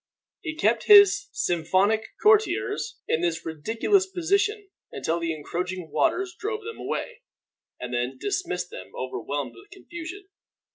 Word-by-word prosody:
He 315 Hz, -5 st, -5 dB
kept 320 Hz, -, +1 dB
his 410 Hz, -1 st, +7 dB
sycophantic 185 Hz, +6 st, +1 dB, 0.2 s
courtiers 430 Hz, +2 st, +2 dB
in 160 Hz, -, +1 dB
this 165 Hz, -2 st, -1 dB
ridiculous 225 Hz, -, +1 dB
position 400 Hz, +3 st, 0 dB, 0.2 s
until 160 Hz, +5 st, -1 dB
the 165 Hz, -1 st, -1 dB
encroaching 175 Hz, +2 st, -4 dB
waters 355 Hz, -, +1 dB
drove 435 Hz, +1 st, -3 dB
them 455 Hz, +2 st, -7 dB
away, -, -, -4 dB, 0.6 s
and 125 Hz, 0 st, -6 dB
then 125 Hz, +2 st, -1 dB
dismissed 180 Hz, 0 st, -2 dB
them -, -, -10 dB
overwhelmed 130 Hz, +1 st, -4 dB
with 115 Hz, -, -16 dB
confusion. 345 Hz, +3 st, -9 dB
205 Hz, 130 wpm, -26 LUFS, -, 0.6 s, his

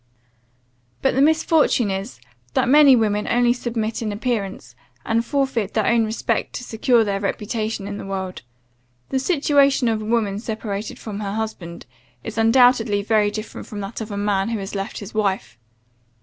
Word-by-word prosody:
"But 270 Hz, -, +3 dB
the 270 Hz, -, +2 dB
misfortune 310 Hz, -7 st, +3 dB
is, 195 Hz, +4 st, -5 dB, 0.4 s
that -, -, +2 dB
many 285 Hz, 0 st, +7 dB
women 210 Hz, -3 st, 0 dB
only 240 Hz, 0 st, +3 dB
submit 230 Hz, -3 st, -3 dB
in 215 Hz, -2 st, -2 dB
appearance, 205 Hz, -, -3 dB, 0.3 s
and 230 Hz, +1 st, +1 dB
forfeit 255 Hz, -6 st, -1 dB
their 220 Hz, -2 st, +2 dB
own 235 Hz, -1 st, +3 dB
respect 220 Hz, +1 st, -2 dB
to 250 Hz, -, -5 dB
secure 235 Hz, 0 st, +2 dB
their 200 Hz, -2 st, -1 dB
reputation 215 Hz, +1 st, -3 dB
in 205 Hz, 0 st, -5 dB
the -, -, -7 dB
world. 190 Hz, -1 st, -4 dB, 0.7 s
The 265 Hz, -, 0 dB
situation 280 Hz, -3 st, +3 dB
of 220 Hz, -1 st, 0 dB
a -, -, -6 dB
woman 215 Hz, -3 st, 0 dB
separated 215 Hz, -2 st, -5 dB
from 210 Hz, -2 st, -7 dB
her 200 Hz, -1 st, -3 dB
husband, 195 Hz, -6 st, -5 dB, 0.4 s
is -, -, -5 dB
undoubtedly 225 Hz, -3 st, +4 dB
very 215 Hz, -1 st, +2 dB
different 215 Hz, +1 st, -7 dB
from 205 Hz, -1 st, -6 dB
that 200 Hz, +4 st, -6 dB
of 220 Hz, -, -5 dB
a 200 Hz, -, -5 dB
man 200 Hz, 0 st, 0 dB
who 230 Hz, -, -1 dB
has 195 Hz, -1 st, -6 dB
left 195 Hz, +2 st, -4 dB
his 205 Hz, -, -9 dB
wife. 195 Hz, -, -1 dB
220 Hz, 170 wpm, -22 LUFS, 205-240 Hz, 0.7 s, many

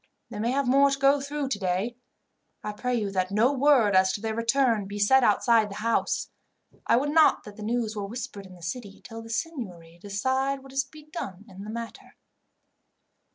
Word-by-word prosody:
They 210 Hz, -, -6 dB
may 230 Hz, +2 st, 0 dB
have 270 Hz, +1 st, 0 dB
more 275 Hz, +2 st, +5 dB
to 275 Hz, -, -1 dB
go 275 Hz, +1 st, +4 dB
through 285 Hz, 0 st, -3 dB
today. 200 Hz, +1 st, -1 dB, 0.7 s
I 210 Hz, -, -3 dB
pray 250 Hz, +4 st, -2 dB
you 210 Hz, -4 st, -1 dB
that 185 Hz, -1 st, 0 dB
no 225 Hz, +7 st, +3 dB
word, 260 Hz, -7 st, +4 dB
as 190 Hz, 0 st, +5 dB
to 205 Hz, -, -3 dB
their 220 Hz, 0 st, -2 dB
return, 230 Hz, -2 st, +1 dB
be 200 Hz, +1 st, -6 dB
said 255 Hz, +6 st, +4 dB
outside 220 Hz, 0 st, +3 dB
the 200 Hz, -, -8 dB
house. 230 Hz, +2 st, -1 dB, 0.6 s
I -, -, +5 dB
would 290 Hz, +3 st, 0 dB
not 315 Hz, 0 st, +5 dB
that 210 Hz, -1 st, -11 dB
the 215 Hz, -, -11 dB
news 225 Hz, 0 st, -1 dB
were 205 Hz, -1 st, -4 dB
whispered 205 Hz, -3 st, -7 dB
in 185 Hz, -, -14 dB
the 175 Hz, -, -15 dB
city, 200 Hz, +3 st, -6 dB
till 225 Hz, -1 st, -8 dB
the 225 Hz, -, -11 dB
seignory 215 Hz, -, -5 dB
decide 260 Hz, +8 st, -1 dB
what 270 Hz, -1 st, -13 dB
is 270 Hz, +1 st, +1 dB
to -, -, -29 dB
be 305 Hz, -1 st, -13 dB
done 200 Hz, -, -6 dB
in 195 Hz, 0 st, -10 dB
the -, -, -7 dB
matter." 230 Hz, +1 st, -8 dB
230 Hz, 205 wpm, -27 LUFS, 205-265 Hz, 0.7 s, more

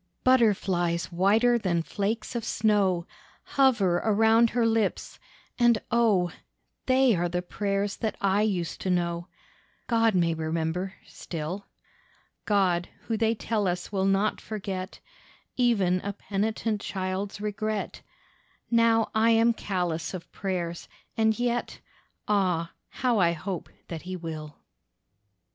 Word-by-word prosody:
Butterflies 190 Hz, -9 st, +2 dB
whiter 220 Hz, +7 st, +3 dB
than 170 Hz, -5 st, 0 dB
flakes 215 Hz, +6 st, -3 dB
of 235 Hz, -, -2 dB
snow 205 Hz, -6 st, +1 dB, 0.4 s
Hover 230 Hz, -10 st, +3 dB
around 225 Hz, +3 st, +4 dB
her 235 Hz, 0 st, +1 dB
lips, 225 Hz, -3 st, 0 dB, 0.4 s
and 240 Hz, -2 st, +5 dB
oh! 210 Hz, -7 st, +3 dB, 0.6 s
They 260 Hz, -3 st, +4 dB
are 175 Hz, 0 st, 0 dB
the 180 Hz, +1 st, -2 dB
prayers 200 Hz, +2 st, -2 dB
that 220 Hz, -, -2 dB
I 195 Hz, +1 st, +2 dB
used 185 Hz, -6 st, -1 dB
to 190 Hz, -, -2 dB
know, 170 Hz, -1 st, 0 dB, 0.6 s
God 225 Hz, -3 st, +2 dB
may 170 Hz, -2 st, +2 dB
remember 160 Hz, +3 st, -2 dB
still. 170 Hz, +4 st, -6 dB, 0.8 s
God 185 Hz, -4 st, +2 dB
who 225 Hz, -, -2 dB
they 225 Hz, +1 st, +1 dB
tell 210 Hz, -2 st, -1 dB
us 180 Hz, +1 st, -3 dB
will 190 Hz, -2 st, 0 dB
not 195 Hz, +2 st, +1 dB
forget 195 Hz, -3 st, -5 dB, 0.6 s
Even 200 Hz, -8 st, +2 dB
a 200 Hz, -, -4 dB
penitent 210 Hz, +2 st, -2 dB
child's 190 Hz, +1 st, -3 dB
regret! 210 Hz, 0 st, -3 dB, 0.7 s
Now 230 Hz, -1 st, +3 dB
I 220 Hz, +1 st, +3 dB
am 230 Hz, +1 st, +4 dB
callous 180 Hz, -5 st, -2 dB
of 175 Hz, -1 st, -9 dB
prayers, 175 Hz, -3 st, -4 dB, 0.3 s
and 220 Hz, -1 st, +2 dB
yet— 240 Hz, 0 st, -1 dB, 0.5 s
Ah, 180 Hz, -5 st, +1 dB, 0.2 s
how 245 Hz, -4 st, 0 dB
I 170 Hz, -2 st, +4 dB
hope 180 Hz, +2 st, -5 dB, 0.2 s
that 165 Hz, -2 st, -6 dB
He 185 Hz, +1 st, -6 dB
will. 155 Hz, -4 st, -7 dB
200 Hz, 125 wpm, -27 LUFS, 180-225 Hz, 0.8 s, and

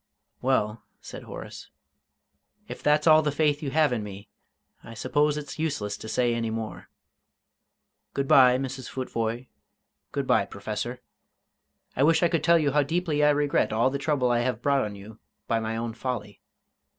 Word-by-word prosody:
"Well," 115 Hz, -4 st, 0 dB, 0.2 s
said -, -, -9 dB
Horace, -, -, -9 dB, 1.0 s
"if -, -, -8 dB
that's 150 Hz, +1 st, +2 dB
all 155 Hz, -1 st, +7 dB
the 150 Hz, -1 st, 0 dB
faith 145 Hz, 0 st, +1 dB
you 145 Hz, -, -3 dB
have 150 Hz, -1 st, +2 dB
in 110 Hz, -3 st, -2 dB
me, 100 Hz, 0 st, -9 dB, 0.5 s
I 115 Hz, -, -10 dB
suppose 145 Hz, +5 st, +1 dB
it's 150 Hz, 0 st, -7 dB
useless 140 Hz, -11 st, -2 dB
to 110 Hz, -, -8 dB
say 120 Hz, 0 st, +1 dB
any 115 Hz, -1 st, -1 dB
more. 110 Hz, -1 st, -6 dB, 1.3 s
Good 140 Hz, 0 st, -1 dB
bye, 125 Hz, -2 st, +6 dB
Mrs. 130 Hz, -1 st, -5 dB
Futvoye; 120 Hz, -2 st, -3 dB, 0.7 s
good -, -, -2 dB
bye, -, -, +3 dB
Professor. -, -, -5 dB, 0.9 s
I -, -, -1 dB
wish 160 Hz, +4 st, +4 dB
I 170 Hz, -, +4 dB
could 165 Hz, -3 st, 0 dB
tell 170 Hz, 0 st, +5 dB
you 150 Hz, -3 st, +1 dB
how 150 Hz, +2 st, +3 dB
deeply 155 Hz, 0 st, 0 dB
I 150 Hz, -, +6 dB
regret 145 Hz, 0 st, +1 dB
all 115 Hz, +4 st, +2 dB
the 140 Hz, -, -3 dB
trouble 140 Hz, -4 st, +1 dB
I 120 Hz, -, +2 dB
have 120 Hz, -2 st, -1 dB
brought 140 Hz, -1 st, +3 dB
on 105 Hz, -1 st, -5 dB
you 105 Hz, +2 st, -12 dB, 0.3 s
by 115 Hz, -, +1 dB
my 110 Hz, 0 st, -3 dB
own 115 Hz, 0 st, -3 dB
folly. 110 Hz, -4 st, -5 dB
130 Hz, 175 wpm, -26 LUFS, 115-150 Hz, 1.3 s, all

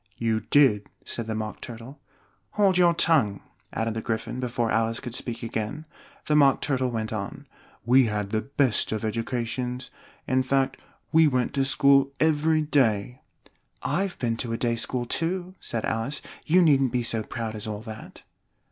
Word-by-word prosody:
"You 115 Hz, -1 st, 0 dB
did," 110 Hz, -2 st, +3 dB, 0.2 s
said 115 Hz, -2 st, -4 dB
the 110 Hz, -, -2 dB
Mock 110 Hz, -1 st, -5 dB
Turtle. 120 Hz, +5 st, -9 dB, 0.5 s
"Hold 200 Hz, -3 st, +3 dB
your 175 Hz, -1 st, +4 dB
tongue!" 135 Hz, -13 st, +3 dB, 0.3 s
added 115 Hz, 0 st, -2 dB
the 110 Hz, -, -3 dB
Gryphon, 115 Hz, +2 st, -3 dB
before 120 Hz, -2 st, -1 dB
Alice 115 Hz, 0 st, +1 dB
could 120 Hz, -, -7 dB
speak 120 Hz, -1 st, -4 dB
again. 115 Hz, +7 st, -4 dB, 0.4 s
The 150 Hz, -, +1 dB
Mock 140 Hz, -2 st, +5 dB
Turtle 130 Hz, -2 st, 0 dB
went 110 Hz, -2 st, -3 dB
on. 100 Hz, -2 st, -5 dB, 0.4 s
"We 130 Hz, +2 st, +5 dB
had 105 Hz, -2 st, -2 dB
the 110 Hz, -1 st, +1 dB
best 140 Hz, -3 st, 0 dB
of 110 Hz, 0 st, -2 dB
educations 125 Hz, +3 st, -3 dB, 0.4 s
in 130 Hz, 0 st, +2 dB
fact, 135 Hz, +1 st, 0 dB, 0.3 s
we 160 Hz, -1 st, +6 dB
went 125 Hz, -2 st, 0 dB
to 135 Hz, -1 st, +1 dB
school 140 Hz, 0 st, +4 dB
every 155 Hz, 0 st, +2 dB
day 125 Hz, -5 st, +1 dB, 0.3 s
" -, -, -32 dB, 0.2 s
"I've 195 Hz, -2 st, -2 dB
been 115 Hz, -2 st, -1 dB
to 115 Hz, -1 st, -3 dB
a -, -, -1 dB
day 120 Hz, -1 st, 0 dB
school 120 Hz, +1 st, -1 dB
too," 175 Hz, +7 st, -2 dB
said 115 Hz, -2 st, -3 dB
Alice; 120 Hz, +6 st, -2 dB, 0.2 s
"you 180 Hz, +3 st, +5 dB
needn't 135 Hz, -5 st, +4 dB
be 125 Hz, -1 st, 0 dB
so 115 Hz, -1 st, +1 dB
proud 110 Hz, 0 st, -5 dB
as 105 Hz, 0 st, -5 dB
all 105 Hz, 0 st, -5 dB
that." 110 Hz, -1 st, -10 dB
125 Hz, 175 wpm, -26 LUFS, 110-140 Hz, 0.5 s, we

